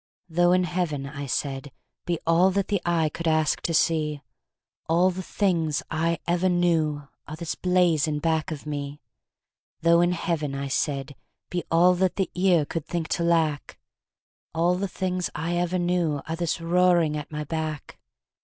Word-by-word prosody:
"Though 175 Hz, +1 st, +3 dB
in 185 Hz, 0 st, +4 dB
Heaven," 170 Hz, -5 st, -2 dB
I 140 Hz, 0 st, -6 dB
said, 135 Hz, +1 st, -3 dB, 0.4 s
"be 175 Hz, -1 st, 0 dB
all 170 Hz, +3 st, +4 dB
That 195 Hz, +1 st, -1 dB
the 200 Hz, -3 st, 0 dB
eye 165 Hz, -2 st, +1 dB
could 170 Hz, +2 st, -5 dB
ask 155 Hz, -1 st, +2 dB
to -, -, -2 dB
see, 155 Hz, -2 st, +1 dB, 0.7 s
All 175 Hz, +3 st, +4 dB
the 185 Hz, +1 st, -5 dB
things 170 Hz, -6 st, 0 dB
I 165 Hz, +1 st, 0 dB
ever 175 Hz, +2 st, +1 dB
knew 160 Hz, -5 st, +1 dB, 0.2 s
Are 155 Hz, -, -6 dB
this 165 Hz, 0 st, -4 dB
blaze 180 Hz, -4 st, +2 dB
in 150 Hz, -1 st, -1 dB
back 160 Hz, 0 st, 0 dB
of 155 Hz, -2 st, -6 dB
me." 145 Hz, -1 st, -5 dB, 0.8 s
"Though 170 Hz, +1 st, +5 dB
in 175 Hz, +1 st, +2 dB
Heaven," 155 Hz, -5 st, -2 dB
I 140 Hz, 0 st, -4 dB
said, 140 Hz, 0 st, -2 dB, 0.4 s
"be 175 Hz, -1 st, -2 dB
all 175 Hz, +2 st, +5 dB
That 185 Hz, 0 st, +1 dB
the 190 Hz, -3 st, -1 dB
ear 180 Hz, -4 st, +3 dB
could 165 Hz, 0 st, -5 dB
think 170 Hz, -2 st, -3 dB
to 170 Hz, -, 0 dB
lack, 160 Hz, -4 st, 0 dB, 0.8 s
All 170 Hz, +2 st, +3 dB
the 190 Hz, +2 st, -1 dB
things 185 Hz, -1 st, -2 dB
I 165 Hz, +2 st, -2 dB
ever 175 Hz, +1 st, 0 dB
knew 175 Hz, -4 st, 0 dB
Are 165 Hz, -, -2 dB
this 170 Hz, 0 st, -2 dB
roaring 170 Hz, -2 st, +3 dB
at 150 Hz, 0 st, -6 dB
my 150 Hz, 0 st, -3 dB
back." 155 Hz, -1 st, -5 dB
165 Hz, 175 wpm, -25 LUFS, 150-175 Hz, 0.8 s, Though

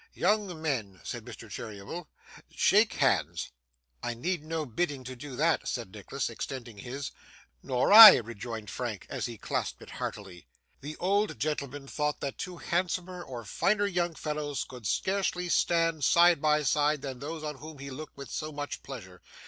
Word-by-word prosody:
'Young 200 Hz, -3 st, +1 dB
men,' 115 Hz, -, -2 dB
said -, -, -5 dB
Mr. -, -, -10 dB
Cheeryble, 110 Hz, -, -7 dB, 0.4 s
'shake -, -, +4 dB
hands!' -, -, +1 dB, 0.5 s
'I 120 Hz, -, -3 dB
need 170 Hz, +6 st, -2 dB
no 160 Hz, 0 st, -3 dB
bidding 140 Hz, +2 st, -2 dB
to 130 Hz, +1 st, -7 dB
do 130 Hz, +1 st, -8 dB
that,' 160 Hz, +2 st, +1 dB
said 115 Hz, -6 st, -3 dB
Nicholas, 110 Hz, +6 st, -4 dB
extending 120 Hz, -2 st, -6 dB
his. 130 Hz, +5 st, -5 dB, 0.5 s
'Nor 125 Hz, +9 st, +2 dB
I,' 220 Hz, 0 st, +14 dB
rejoined 115 Hz, -1 st, -5 dB
Frank, 120 Hz, -6 st, -4 dB
as -, -, -2 dB
he 120 Hz, -2 st, -8 dB
clasped -, -, -3 dB
it -, -, -12 dB
heartily. 95 Hz, -4 st, -6 dB, 0.3 s
The 150 Hz, +2 st, -7 dB
old 200 Hz, -, +1 dB
gentleman 140 Hz, 0 st, -3 dB
thought 150 Hz, +1 st, -1 dB
that 140 Hz, -, -4 dB
two 180 Hz, -1 st, -5 dB
handsomer 180 Hz, +1 st, -2 dB
or 125 Hz, -8 st, -7 dB
finer 205 Hz, -, +1 dB
young 175 Hz, -4 st, 0 dB
fellows 150 Hz, -2 st, -3 dB
could 125 Hz, -5 st, -8 dB
scarcely 185 Hz, -, 0 dB
stand 165 Hz, -2 st, +2 dB
side 170 Hz, +2 st, +5 dB
by 150 Hz, 0 st, +3 dB
side 150 Hz, +1 st, +2 dB
than 135 Hz, -3 st, -5 dB
those 155 Hz, +3 st, -6 dB
on 150 Hz, -2 st, -4 dB
whom 155 Hz, +2 st, -10 dB
he 140 Hz, 0 st, -8 dB
looked 150 Hz, +3 st, -9 dB
with 140 Hz, -4 st, -8 dB
so 155 Hz, 0 st, -3 dB
much 145 Hz, -1 st, -5 dB
pleasure. 95 Hz, -9 st, -10 dB
145 Hz, 165 wpm, -29 LUFS, 125-165 Hz, 0.5 s, I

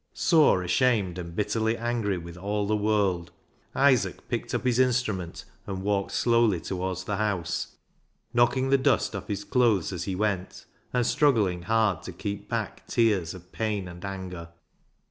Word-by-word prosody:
Sore, 155 Hz, -, +4 dB
ashamed, 95 Hz, -1 st, +1 dB
and 85 Hz, -1 st, -7 dB
bitterly 110 Hz, +3 st, 0 dB
angry 115 Hz, -4 st, -1 dB
with 85 Hz, 0 st, -8 dB
all 100 Hz, +3 st, -2 dB
the 105 Hz, +1 st, +1 dB
world, 100 Hz, -5 st, +1 dB, 0.4 s
Isaac 135 Hz, -3 st, +2 dB
picked -, -, -2 dB
up -, -, -2 dB
his 125 Hz, -1 st, +2 dB
instrument 115 Hz, -9 st, 0 dB, 0.2 s
and 95 Hz, -1 st, -4 dB
walked 100 Hz, -1 st, 0 dB
slowly 115 Hz, -6 st, +3 dB
towards 95 Hz, +1 st, -3 dB
the 100 Hz, +1 st, -2 dB
house, 95 Hz, -5 st, -2 dB, 0.6 s
knocking 120 Hz, +2 st, +3 dB
the 135 Hz, -, +5 dB
dust -, -, +2 dB
off -, -, -6 dB
his 100 Hz, -1 st, -3 dB
clothes 115 Hz, -, +2 dB
as 90 Hz, -1 st, -4 dB
he 95 Hz, -, -2 dB
went, 100 Hz, -2 st, -2 dB, 0.3 s
and 125 Hz, -1 st, +1 dB
struggling 110 Hz, -12 st, +2 dB
hard 110 Hz, -2 st, +1 dB
to -, -, -7 dB
keep 100 Hz, 0 st, -5 dB
back 115 Hz, -3 st, -4 dB
tears 100 Hz, -8 st, +1 dB
of 90 Hz, 0 st, -14 dB
pain 105 Hz, -4 st, -2 dB
and 90 Hz, 0 st, -10 dB
anger. 95 Hz, -3 st, -6 dB
100 Hz, 160 wpm, -27 LUFS, 90-115 Hz, 0.6 s, the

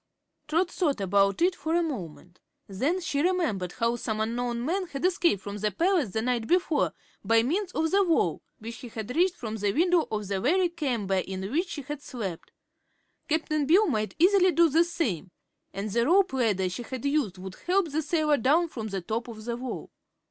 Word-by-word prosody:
Trot 335 Hz, +4 st, +1 dB
thought 300 Hz, -, 0 dB
about 200 Hz, -, +2 dB
it 365 Hz, +1 st, +3 dB
for 320 Hz, -2 st, -2 dB
a 345 Hz, -, +3 dB
moment. 180 Hz, -, -6 dB, 0.3 s
Then 275 Hz, -, -1 dB
she 310 Hz, -4 st, -1 dB
remembered 310 Hz, -, 0 dB
how 235 Hz, +1 st, 0 dB
some 220 Hz, -2 st, -3 dB
unknown 235 Hz, +2 st, -2 dB
man 370 Hz, +4 st, -1 dB
had 275 Hz, 0 st, -4 dB
escaped 345 Hz, -, +2 dB
from 200 Hz, 0 st, -5 dB
the 210 Hz, +1 st, 0 dB
palace 335 Hz, -, +1 dB
the 220 Hz, +3 st, -2 dB
night 240 Hz, -2 st, -1 dB
before, 350 Hz, -3 st, +2 dB, 0.3 s
by 230 Hz, 0 st, +4 dB
means 365 Hz, -, -1 dB
of 320 Hz, 0 st, 0 dB
the 400 Hz, +1 st, +4 dB
wall, 335 Hz, -3 st, +1 dB, 0.2 s
which 230 Hz, 0 st, -8 dB
he 245 Hz, -, -9 dB
had 220 Hz, +3 st, -6 dB
reached 360 Hz, +2 st, +3 dB
from 220 Hz, -2 st, -5 dB
the 205 Hz, -1 st, 0 dB
window 345 Hz, -, +2 dB
of 210 Hz, -2 st, -3 dB
the 195 Hz, -1 st, -2 dB
very 355 Hz, +8 st, +3 dB
chamber 245 Hz, -, -1 dB
in 190 Hz, +2 st, -5 dB
which 345 Hz, +6 st, 0 dB
she 290 Hz, -, -5 dB
had 295 Hz, +1 st, -6 dB
slept. 205 Hz, -, -6 dB, 0.8 s
Cap'n 305 Hz, -2 st, 0 dB
Bill 375 Hz, +8 st, +5 dB
might 215 Hz, -, -1 dB
easily 370 Hz, +1 st, +5 dB
do 335 Hz, 0 st, +4 dB
the 325 Hz, +4 st, +4 dB
same. 235 Hz, -, -2 dB, 0.4 s
And 200 Hz, +2 st, -4 dB
the 235 Hz, +3 st, +1 dB
rope 370 Hz, -2 st, +4 dB
ladder 215 Hz, -8 st, +1 dB
she 180 Hz, +6 st, -5 dB
had 255 Hz, +2 st, -6 dB
used 280 Hz, -10 st, 0 dB
would 185 Hz, 0 st, -8 dB
help 365 Hz, -3 st, +2 dB
the 310 Hz, +2 st, 0 dB
sailor 305 Hz, -1 st, +1 dB
down 305 Hz, +8 st, +3 dB
from 225 Hz, -7 st, -5 dB
the 195 Hz, -2 st, -3 dB
top 225 Hz, +7 st, -3 dB
of 220 Hz, -2 st, -9 dB
the 235 Hz, -1 st, -2 dB
wall. 250 Hz, +1 st, -6 dB
265 Hz, 200 wpm, -27 LUFS, 215-335 Hz, 0.8 s, Bill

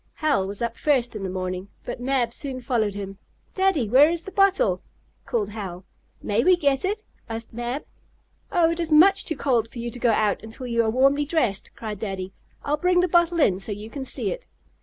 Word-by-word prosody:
Hal 285 Hz, -12 st, +1 dB
was 200 Hz, +3 st, -5 dB
up 235 Hz, 0 st, -3 dB
first 255 Hz, -6 st, +1 dB
in 210 Hz, -, -5 dB
the 190 Hz, -, -3 dB
morning, 185 Hz, 0 st, -4 dB, 0.2 s
but -, -, -5 dB
Mab 250 Hz, -2 st, 0 dB
soon 265 Hz, -2 st, -4 dB
followed 230 Hz, -5 st, 0 dB
him. 195 Hz, -1 st, -6 dB, 0.3 s
"Daddy, 375 Hz, -, +2 dB
where 270 Hz, +8 st, +6 dB
is 340 Hz, 0 st, -2 dB
the 390 Hz, -, -8 dB
bottle?" 395 Hz, +5 st, +3 dB, 0.5 s
called 225 Hz, -6 st, -1 dB
Hal. 195 Hz, -4 st, -7 dB, 0.4 s
"May 210 Hz, +3 st, +1 dB
we 365 Hz, +1 st, +6 dB
get 280 Hz, -4 st, +2 dB
it?" 415 Hz, +3 st, -1 dB, 0.3 s
asked 225 Hz, 0 st, -6 dB
Mab. 240 Hz, +4 st, -4 dB, 0.7 s
"Oh, 340 Hz, -3 st, +3 dB
it 335 Hz, -, -3 dB
is 330 Hz, -2 st, -1 dB
much 385 Hz, +6 st, +6 dB
too 320 Hz, -, -2 dB
cold 240 Hz, -5 st, +1 dB
for 240 Hz, -, -12 dB
you 235 Hz, 0 st, -4 dB
to 245 Hz, -, -9 dB
go 240 Hz, -, +2 dB
out 215 Hz, -2 st, +2 dB
until 225 Hz, +4 st, -8 dB
you 235 Hz, -1 st, +1 dB
are 220 Hz, -, +1 dB
warmly 275 Hz, +5 st, +3 dB
dressed!" 255 Hz, -, 0 dB
cried 215 Hz, -3 st, -6 dB
Daddy. 190 Hz, -3 st, -4 dB, 0.3 s
"I'll 295 Hz, +1 st, +1 dB
bring 360 Hz, +2 st, +3 dB
the 365 Hz, -, +2 dB
bottle 345 Hz, 0 st, +3 dB
in 190 Hz, -, +3 dB
so 205 Hz, -, -5 dB
you 210 Hz, +2 st, -6 dB
can 275 Hz, -, -5 dB
see 260 Hz, -, -3 dB
it." -, -, -7 dB
245 Hz, 215 wpm, -24 LUFS, 215-320 Hz, 0.7 s, where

